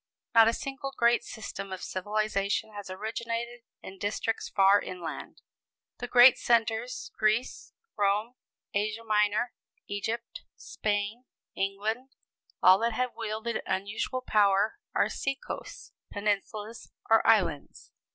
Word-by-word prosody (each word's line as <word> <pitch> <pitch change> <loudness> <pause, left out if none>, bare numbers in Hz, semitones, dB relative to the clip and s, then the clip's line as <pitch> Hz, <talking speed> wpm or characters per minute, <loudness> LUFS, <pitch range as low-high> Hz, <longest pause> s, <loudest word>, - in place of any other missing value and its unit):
Not 225 -1 +8
a 230 - +3
single 275 +2 -5
great 235 0 +4
system 195 -3 -7
of 185 - -6
civilization 205 +1 -1
has 205 -2 -8
originated 230 +4 -4 0.2
in 190 0 -10
districts 215 +2 -2
far 195 +1 +5
inland. 175 -3 -7 0.6
The 245 - -4
great 245 +1 +7
centers 230 +1 0
Greece, 215 +3 0 0.2
Rome, 205 +3 +1 0.4
Asia 210 +2 -1
Minor, 210 +2 +1 0.3
Egypt, 225 +3 -4
Spain, 210 +3 -3 0.3
England 215 +7 -2 0.5
all 185 +1 +8
that 230 0 0
have 250 +2 -1
wielded 220 +1 -3
unusual 210 +6 -2
power 210 - +2 0.2
are - - +3
sea 275 0 -2
coasts, - - -8 0.2
peninsulas 210 +2 -3 0.2
or 225 0 +5
islands. 190 -10 +1
215 Hz, 115 wpm, -29 LUFS, 200-235 Hz, 0.6 s, Not